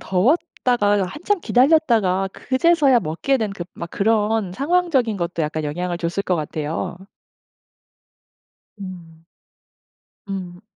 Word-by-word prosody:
더웠다가 210 - +1
한참 345 - -2
기다렸다가 235 - +3
그제서야 275 -1 +3
먹게 170 - 0
된 215 -3 -2 0.2
막 170 - -7
그런 215 -2 +1
상황적인 280 - +1
것도 170 -2 -2
약간 155 0 -2
영향을 175 +4 -3
줬을 175 +3 -2
것 185 -2 0
같아요. 155 +3 -3 1.8
음. 170 -4 -10 1.0
음. 180 -2 -6
200 Hz, 225 characters per minute, -21 LUFS, 175-260 Hz, 1.8 s, 기다렸다가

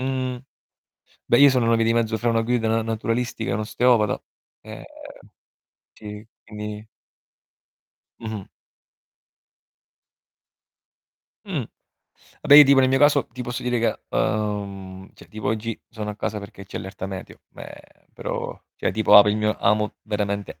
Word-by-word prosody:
Mhmm, 130 -1 -2 0.9
beh, 120 - +4
io 145 0 +8
sono 125 -3 +1
una 115 0 +3
via 115 0 +1
di 115 - +2
mezzo 110 -1 0
fra 120 - 0
una 115 -1 +2
guida 115 -1 0
na 115 +1 +1
naturalistica 115 +1 -2
e - - 0
un 100 - -1
osteopata, 110 0 +1 0.4
ehm, - - -10 1.1
ci 105 0 -10 0.2
quindi 105 0 -8 1.3
Mh-mh. 110 -4 -6 3.0
Mh. - - -3 0.8
Vabbè, 145 - +6
io 150 - +11
tipo 135 -1 +5
nel 130 - +3
mio 135 - +2
caso, 145 0 +4
ti 125 +2 -7
posso 120 0 -5
dire 125 0 0
che, 115 - -2
uhm, 100 -3 -3
cioè - - -17
tipo 110 -1 -7
oggi 110 +1 -3
sono 105 -1 -6
a 105 - -9
casa 105 0 -3
perché 100 0 -11
c'è - - -8
allerta 95 0 -7
meteo, 95 -1 -8
meh, - - -14
però - - -5 0.2
cioè - - -1
tipo 110 -1 +5
apo 105 0 +8
il 105 - +1
mio 105 0 0
amo 105 +1 +1
veramente 100 -4 -3
110 Hz, 150 wpm, -23 LUFS, 105-120 Hz, 3.0 s, io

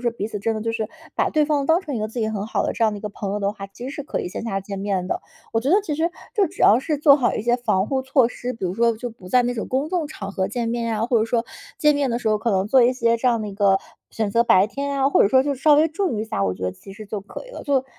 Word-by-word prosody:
说 240 -1 0
彼 205 - -2
此 215 -1 -5
真 225 +3 -1
的 215 - -3
就 230 - -1
是 220 -1 -3 0.3
把 - - +1
对 305 -1 +2
方 290 -2 0
当 325 +4 +4
成 295 -6 -5
一 - - -2
个 215 - -1
自 230 +3 -7
己 220 - 0
很 205 -1 -3
好 220 - -1
的 - - -1
这 - - -3
样 215 - +2
的 205 - -5
一 - - -11
个 210 - -3
朋 200 -1 -5
友 205 - -1
的 200 0 0
话， 195 -2 -8
其 195 +5 -11
实 - - -4
是 290 - -5
可 285 - -3
以 - - -4
线 180 - -6
下 210 -4 -2
见 195 0 -6
面 195 -2 -1
的。 - - -2 0.3
我 225 - +1
觉 260 - -2
得 400 +5 +4
其 315 -7 -3
实 325 +3 0 0.2
就 410 -3 +3
只 - - -6
要 215 - +7
是 300 +3 -1
做 285 -1 +6
好 255 -4 +1
一 - - -2
些 240 +1 +2
防 200 -5 0
护 265 -1 0
措 265 -1 +3
施， 245 0 -5
比 225 - -6
如 180 - -1
说 230 0 +2
就 245 +2 -5
不 215 -5 -14
在 250 +5 +4
那 245 - 0
种 225 -3 -4
公 270 +4 -1
众 345 -5 0
场 200 -10 -7
合 190 -1 -1
见 235 +1 -2
面 230 -1 -1
啊， 220 - 0
或 240 -2 +3
者 220 - +2
说 230 0 0 0.3
见 300 -1 +4
面 285 -2 +1
的 235 - 0
时 225 - 0
候 215 -1 +2
可 230 +2 -1
能 190 0 +1
做 260 +1 +6
一 250 - +4
些 235 -2 +2
这 235 - -2
样 230 -3 +1
的 210 - -4
一 - - -7
个 195 -1 +3 0.3
选 215 -2 -2
择 230 +3 +3
白 190 -4 +5
天 280 +2 -3
啊， 270 0 +3
或 - - +3
者 - - +4
说 260 +4 +5
就 285 - -1
稍 295 +3 +4
微 310 +2 +4
注 330 - -1
意 - - -2
一 - - -4
下， 100 - -2
我 95 -1 0
觉 95 - -11
得 90 - 0
其 145 - -13
实 215 +2 -10
就 205 0 -4
可 200 - -9
以 - - -12
了。 - - -8
就 275 -2 +1
230 Hz, 375 characters per minute, -22 LUFS, 205-275 Hz, 0.3 s, 要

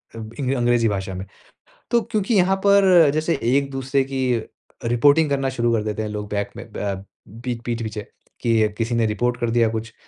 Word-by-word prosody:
इब 110 0 -8
इंग 135 -1 0
अंग्रेज़ी 120 -2 +2
भाषा 95 -1 -3
में। 95 +1 -6 0.7
तो 235 -1 +4
क्योंकि 215 +1 -1
यहाँ 190 0 +3
पर 185 -6 +6
जैसे 155 -1 0
एक-दूसरे 135 +2 +1
की 135 0 -4 0.6
रिपोर्टिंग 145 +6 +4
करना 135 -1 0
शुरू 120 -2 0
कर 110 -2 +1
देते 110 0 -3
हैं 105 - -3
लोग 105 -1 -5
बैक 100 -1 -2
में - - -7
ब 100 -1 -3 0.4
पीठ 120 -2 -3
पीठ-पीछे 110 -3 -3 0.4
कि 115 -2 +2
किसी 115 +1 -1
ने 115 -1 +2
रिपोर्ट 120 +3 0
कर 120 -1 0
दिया 115 -1 +3
कुछ 110 0 -5
120 Hz, 185 wpm, -22 LUFS, 110-140 Hz, 0.7 s, पर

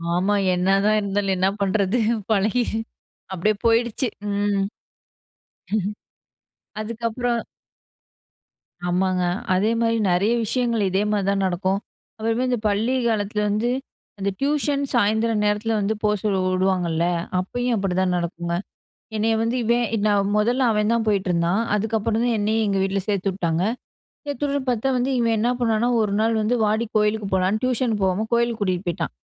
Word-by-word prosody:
ஆமா. 195 +3 +2 0.2
என்னதான் 195 +4 +2
இருந்தாலும் 200 -1 0
என்ன 185 - +2
பண்றது 200 +3 +1 0.3
பழகி 215 +4 +2 0.7
அப்டியே 210 +4 +1
போயிடுச்சு 235 +2 +2 0.2
ம். 200 -1 +1 2.2
அதுக்கப்புறம். 230 +2 -2 1.5
ஆமாங்க. 180 0 +1 0.3
அதேமாரி 230 +4 +1
நெறைய 200 +6 +2
விஷயங்கள் 235 -1 0
இதே 195 +2 +1
மாரி 205 -2 0
தான் 195 -1 0
நடக்கும். 185 +2 0 0.4
அப்புறமே 225 +3 0
இந்த 245 -2 +1
பள்ளி 220 +5 +1
காலத்துல 210 -1 -1
வந்து 215 +4 0 0.5
அந்த 200 0 -1
டியூஷன் 285 0 +1
சாயந்தரம் 220 -1 +2
நேரத்தில 210 +2 +1
வந்து 205 +2 0
போ 210 - +3
சொல்ல 205 -3 +1 0.2
உடுவாங்கல்ல 180 -3 +1 0.3
அப்பயும் 245 +6 -1
அப்டிதான் 185 -2 0
நடக்குங்க. 170 0 -3 0.6
என்னைய 225 +1 +2
வந்து 230 +2 0
இவன் 235 +1 +2 0.2
நான் 205 -1 +2
முதல்ல 240 +5 +2
அவன்தான் 220 +2 +1
போயிட்டுருந்தான் 185 -1 +1
அதுக்கப்புறம் 220 +1 0
தான் 235 -2 +1
என்னையும் 220 +2 +1
எங்க 195 - +1
வீட்ல 195 +1 0
சேர்த்துவுட்டாங்க 185 -4 0 0.6
சேர்த்துரு 285 0 -1
பார்த்தா 245 +1 0
வந்து 250 +2 0
இவன் 230 -1 +2
என்ன 235 +3 +2
பண்ணான்னா? 230 0 +1
ஒரு 210 -2 +1
நாள் 225 +1 +2
வந்து 220 +3 +1
"வாடி 215 +2 +1
கோயிலுக்கு 210 -1 +1
போகலான்னு" 190 +3 +2
டியூஷன் 250 -2 +1
போகாம 190 +3 +1
கோயிலுக்கு 235 -1 +1
கூட்டிட்டு 185 -1 -1
போயிட்டான். 170 - -2
210 Hz, 130 wpm, -23 LUFS, 195-230 Hz, 2.2 s, போ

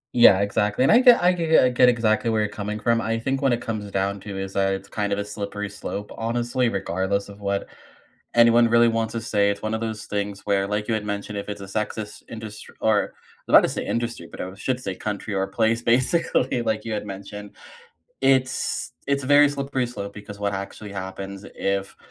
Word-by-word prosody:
Yeah, 100 -5 +7
exactly. 105 +3 +1
And - - +5
I 230 - +7
get 245 -7 +6
I 180 - +6
g 170 -2 -2
get 160 -3 +6
I 125 - +4
get 125 0 +5
exactly 115 -1 +1
where 110 -1 +2
you're 105 - +1
coming 105 +1 -4
from, 115 +1 +2
I 115 0 -1
think 135 +3 -2
what 135 -2 +3
it 120 - 0
comes 105 -3 -4
down 100 +1 -1
to 100 -1 -7
is, 95 0 -5
uh, 95 0 +2
it's 95 +1 -4
kind 105 -1 -2
of 100 - +1
a 100 - -2
slippery 105 0 -5
slope, 105 0 -6
honestly, 120 +2 0
regardless 95 0 -1
of 100 0 -12
what 100 0 -1 0.7
anyone 115 0 +6
really 115 0 +5
wants 115 -1 -1
to 115 - -3
say, 100 -2 +2
it's 100 0 -2
one 110 0 -2
of 110 - -1
those 110 -1 -4
things 100 0 -3
where, 100 -1 +1
like 105 +2 -2
you - - +2
had 110 -1 -2
mentioned, 100 0 -4
if 100 - -5
it's 105 -1 -6
a 100 - -6
sexist 105 +1 -4
indust 110 -2 -8
or 110 -2 +2
I - - -15
was - - +10
about - - -1
to - - +1
say - - -4
industry, 115 -8 -3
but - - -8
I 95 +1 -5
should 125 +5 -2
say 95 - -3
country 105 +1 -4
or 95 0 0
place, 110 +3 +1
basically 130 +1 +1
like 110 -2 -1
you 115 - -5
had 105 - -3
mentioned. 100 +1 -8 0.7
It's 130 -1 +1 0.2
it's 140 -1 +1
a - - -5
very 145 +1 +6
slippery 140 -2 -2
slope, 100 -4 -6
because 105 0 -9
what 100 0 -1
actually 100 +1 -6
happens 95 +1 -6
if 100 0 -2
105 Hz, 230 wpm, -24 LUFS, 100-120 Hz, 0.7 s, was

